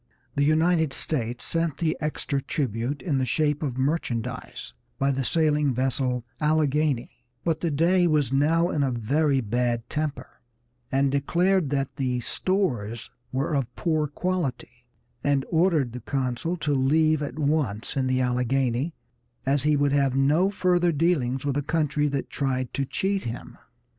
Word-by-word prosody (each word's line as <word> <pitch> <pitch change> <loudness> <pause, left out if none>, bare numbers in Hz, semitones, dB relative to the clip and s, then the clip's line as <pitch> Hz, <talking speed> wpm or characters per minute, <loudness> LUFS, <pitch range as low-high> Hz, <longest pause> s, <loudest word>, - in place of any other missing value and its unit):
The 140 - +2
United 160 0 +3
States 120 -5 -2
sent 165 -3 -1
the 160 -2 0
extra 150 -2 -2
tribute 130 -1 -2
in 145 -7 0
the - - +1
shape 150 +4 +1
of 135 -5 -3
merchandise 130 -5 -3 0.2
by 135 +1 +2
the 135 0 -1
sailing 150 -2 +2
vessel 125 -1 0 0.2
Alleghany; 150 -5 +1 0.2
but 165 -2 0
the 170 - 0
Dey 175 +4 +3
was 150 -5 +1
now 165 +5 +3
in 150 - 0
a 135 - +2
very 135 +4 +1
bad 120 +1 -1
temper, 150 -4 -4 0.5
and 135 0 +2
declared 170 +4 +2
that 135 -1 -2
the 125 -2 0
stores 120 - -1 0.2
were 135 +5 -1
of 135 -4 -1
poor 155 -3 0
quality, 145 -7 -3 0.4
and 140 -2 +1
ordered 160 -7 +2
the 125 - -6
consul 135 +7 -2
to 150 -2 -1
leave 155 +3 +3
at 145 +1 -4
once 140 -8 -1
in 135 -2 +1
the 130 0 +1
Alleghany, 125 +4 0 0.5
as 135 +1 +2
he 150 +2 +3
would 145 0 +2
have 140 -2 +2
no 150 +8 +3
further 180 -3 +2
dealings 140 -5 +1
with 140 -2 0
a - - +1
country 150 0 0
that 140 -2 -3
tried 130 -3 -2
to 140 - -1
cheat 195 +7 -1
him. 115 +1 -6
140 Hz, 155 wpm, -25 LUFS, 130-155 Hz, 0.5 s, United